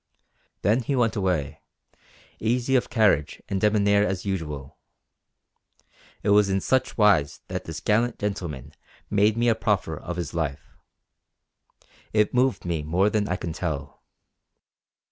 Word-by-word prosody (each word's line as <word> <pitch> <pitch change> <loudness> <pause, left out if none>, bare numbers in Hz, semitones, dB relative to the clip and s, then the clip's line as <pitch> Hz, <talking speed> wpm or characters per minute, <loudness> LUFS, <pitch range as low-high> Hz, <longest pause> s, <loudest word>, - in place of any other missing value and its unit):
Then 110 +6 +3
he 135 +3 -1
went 120 -3 +1
away, 90 -8 -1 0.8
easy 125 +4 +1
of 125 - +1
carriage 105 - +2
and 95 -1 -2
debonair 100 -1 +3
as 95 -2 -2
usual. 75 -7 -4 1.4
It 105 - 0
was 100 -1 +5
in 95 0 +1
such 130 +6 0
wise 100 -10 +3
that - - -4
this 80 -1 -6
gallant 115 +3 +1
gentleman 80 -9 -4 0.4
made 105 +2 +3
me 120 +1 +2
a 115 - +5
proffer 105 -7 -1
of 90 +3 -6
his 85 -4 -4
life. 80 -5 -4 1.4
It 105 -1 +2
moved 125 -3 +1
me 85 -3 -1
more 90 +7 +1
than 105 -1 0
I 90 - 0
can 85 -2 -5
tell. 70 -5 -5
100 Hz, 140 wpm, -25 LUFS, 80-110 Hz, 1.4 s, was